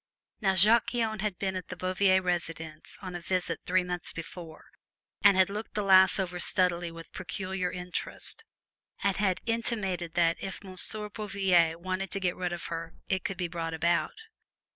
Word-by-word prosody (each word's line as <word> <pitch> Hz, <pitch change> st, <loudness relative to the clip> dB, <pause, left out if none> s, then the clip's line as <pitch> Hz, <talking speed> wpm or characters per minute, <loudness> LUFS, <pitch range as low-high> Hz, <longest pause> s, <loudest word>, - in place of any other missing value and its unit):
Now, 195 Hz, -3 st, +2 dB
Jacques 215 Hz, +7 st, +5 dB
Guyon 225 Hz, -3 st, 0 dB
had 205 Hz, -3 st, -2 dB
been 190 Hz, -1 st, -2 dB
at 185 Hz, -, -5 dB
the 185 Hz, -, -6 dB
Bouvier 185 Hz, +1 st, +2 dB
residence 165 Hz, -3 st, -3 dB
on 185 Hz, -1 st, -5 dB
a 175 Hz, -, -5 dB
visit 185 Hz, +1 st, -1 dB
three 185 Hz, 0 st, +3 dB
months 180 Hz, -1 st, -3 dB
before, 165 Hz, -1 st, -9 dB, 0.6 s
and 200 Hz, -2 st, +7 dB
had 190 Hz, -1 st, +6 dB
looked 210 Hz, +2 st, -6 dB
the 210 Hz, -, 0 dB
lass 190 Hz, 0 st, +7 dB
over 180 Hz, -2 st, -2 dB
stealthily 175 Hz, -1 st, +1 dB
with 165 Hz, 0 st, -11 dB
peculiar 185 Hz, 0 st, -3 dB
interest, 180 Hz, 0 st, -6 dB, 0.6 s
and 200 Hz, -1 st, +2 dB
had 190 Hz, -3 st, +1 dB
intimated 205 Hz, -7 st, -1 dB
that 170 Hz, -1 st, +3 dB
if 195 Hz, +1 st, -5 dB
Monsieur 200 Hz, +3 st, -2 dB
Bouvier 195 Hz, -6 st, +2 dB
wished 185 Hz, +2 st, -3 dB
to 195 Hz, -, 0 dB
get 180 Hz, -2 st, 0 dB
rid 180 Hz, -1 st, -2 dB
of 175 Hz, -1 st, -5 dB
her 165 Hz, 0 st, -5 dB
it 190 Hz, -1 st, 0 dB
could 195 Hz, -5 st, -3 dB
be 180 Hz, -1 st, -1 dB
brought 165 Hz, -1 st, -3 dB
about. 170 Hz, +1 st, +1 dB
185 Hz, 175 wpm, -29 LUFS, 175-195 Hz, 0.6 s, and